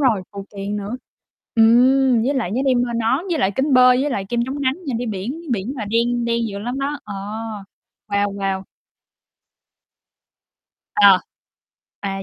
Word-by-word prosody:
rồi, 235 Hz, -9 st, +2 dB
phụ 200 Hz, -1 st, -7 dB
kiện 200 Hz, +1 st, -3 dB
nữa. 205 Hz, +4 st, -4 dB, 0.6 s
Ừm, 245 Hz, +2 st, +5 dB
với 280 Hz, -, +1 dB
lại 230 Hz, -8 st, -1 dB
nhớ 255 Hz, -, 0 dB
đem 255 Hz, -2 st, +3 dB
theo 240 Hz, -, -4 dB
nón, 235 Hz, +8 st, 0 dB
với 330 Hz, -, 0 dB
lại 190 Hz, -, +2 dB
kính 275 Hz, +2 st, +1 dB
bơi, 250 Hz, 0 st, +6 dB
với 290 Hz, +1 st, 0 dB
lại 195 Hz, -5 st, -2 dB
kem 240 Hz, -1 st, 0 dB
chống 280 Hz, +2 st, -4 dB
nắng 260 Hz, -1 st, +1 dB
nha, 265 Hz, -, -2 dB
đi 245 Hz, -, -3 dB
biển 220 Hz, -, -4 dB
biển 210 Hz, +4 st, -2 dB
mà 230 Hz, -, -3 dB
đen 235 Hz, +3 st, 0 dB
đen 235 Hz, -1 st, 0 dB
dữ 200 Hz, -1 st, -6 dB
lắm 245 Hz, +6 st, -4 dB
đó. 285 Hz, +2 st, -2 dB
Ờ. 205 Hz, -, -7 dB, 0.9 s
Wow, 200 Hz, 0 st, 0 dB
wow. 195 Hz, -1 st, -2 dB, 2.3 s
Ờ. 200 Hz, -2 st, +7 dB, 0.8 s
À, 195 Hz, -1 st, -4 dB
235 Hz, 170 wpm, -20 LUFS, 200-260 Hz, 2.3 s, Ờ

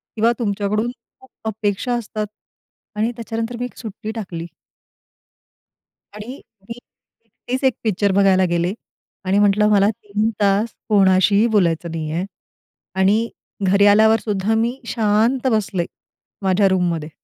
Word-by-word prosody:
किंवा 225 Hz, +2 st, +3 dB
तुमच्याकडून 210 Hz, +2 st, -1 dB, 0.3 s
खूप 260 Hz, -, -19 dB, 0.2 s
अपेक्षा 215 Hz, +2 st, -1 dB
असतात 215 Hz, -2 st, -3 dB, 0.7 s
आणि 220 Hz, +3 st, 0 dB
त्याच्यानंतर 230 Hz, 0 st, -4 dB
मी 245 Hz, -, -1 dB
एक 250 Hz, -, -10 dB
सुट्टी 220 Hz, -1 st, -6 dB
टाकली 175 Hz, -6 st, -5 dB, 1.7 s
आणि 225 Hz, +6 st, -8 dB, 0.3 s
मी 230 Hz, -, -6 dB, 0.5 s
एकटीच 255 Hz, +4 st, -6 dB
एक 260 Hz, -3 st, +4 dB
पिक्चर 205 Hz, -2 st, +1 dB
बघायला 190 Hz, -1 st, +4 dB
गेले 175 Hz, +2 st, 0 dB, 0.5 s
आणि 195 Hz, +2 st, +2 dB
म्हटलं, 205 Hz, +1 st, +4 dB
"मला 205 Hz, 0 st, +4 dB
3 210 Hz, +1 st, -2 dB
तास 205 Hz, +3 st, +2 dB, 0.2 s
कोणाशीही 200 Hz, +2 st, +4 dB
बोलायचं 170 Hz, -3 st, +1 dB
नाहीये." 165 Hz, +2 st, -3 dB, 0.7 s
आणि 205 Hz, +5 st, +2 dB, 0.4 s
घरी 200 Hz, +2 st, +4 dB
आल्यावर 220 Hz, +2 st, +5 dB
सुद्धा 205 Hz, 0 st, 0 dB
मी 235 Hz, +4 st, 0 dB
शांत 225 Hz, +4 st, +1 dB
बसले 200 Hz, -5 st, 0 dB, 0.6 s
माझ्या 195 Hz, +1 st, +3 dB
रूममध्ये. 170 Hz, -4 st, 0 dB
210 Hz, 120 wpm, -20 LUFS, 190-225 Hz, 1.7 s, आल्यावर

